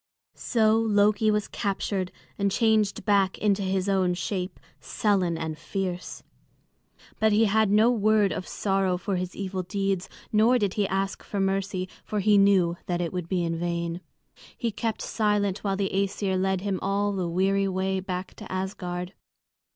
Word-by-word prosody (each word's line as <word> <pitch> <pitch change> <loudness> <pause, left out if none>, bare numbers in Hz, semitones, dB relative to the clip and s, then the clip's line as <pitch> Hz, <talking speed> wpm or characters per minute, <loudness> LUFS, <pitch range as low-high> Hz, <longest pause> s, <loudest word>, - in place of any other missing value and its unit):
So 220 -1 +2
Loki 210 -1 +3
was 210 -1 +1
captured 195 -2 -2 0.2
and 200 0 +1
changed 215 -2 +1
back 200 -2 +3
into 205 -1 +1
his 190 0 -1
own 190 -2 +2
shape, 180 0 -3 0.2
sullen 185 -6 0
and 160 -1 -3
fierce. 185 -3 -4 1.0
But 220 0 +3
he 220 +2 +4
had 215 0 +3
no 215 +4 +5
word 215 -3 +3
of 180 - -5
sorrow 195 -2 0
for 190 +1 -2
his 180 0 -4
evil 190 -1 -3
deeds; 195 0 -2 0.2
nor 225 +4 +5
did 205 -5 0
he 205 -2 0
ask 195 0 -2
for 205 - -5
mercy, 195 -1 -1 0.2
for 210 - -2
he 205 +1 +4
knew 185 -4 +4
that 175 -1 -1
it 175 0 -2
would 180 -2 -4
be 180 -2 0
in 165 -1 -2
vain. 170 0 -2 0.6
He 235 - -1
kept 220 +1 -3
silent 210 -3 0
while 195 -2 0
the 195 -1 -1
Æsir 195 0 0
led 190 0 0
him 195 -2 -2
all 200 +1 0
the 185 -3 -2
weary 195 +3 +1
way 190 0 -1
back 185 0 -5
to - - -10
Asgard. 185 -1 -4
195 Hz, 165 wpm, -26 LUFS, 185-205 Hz, 1.0 s, no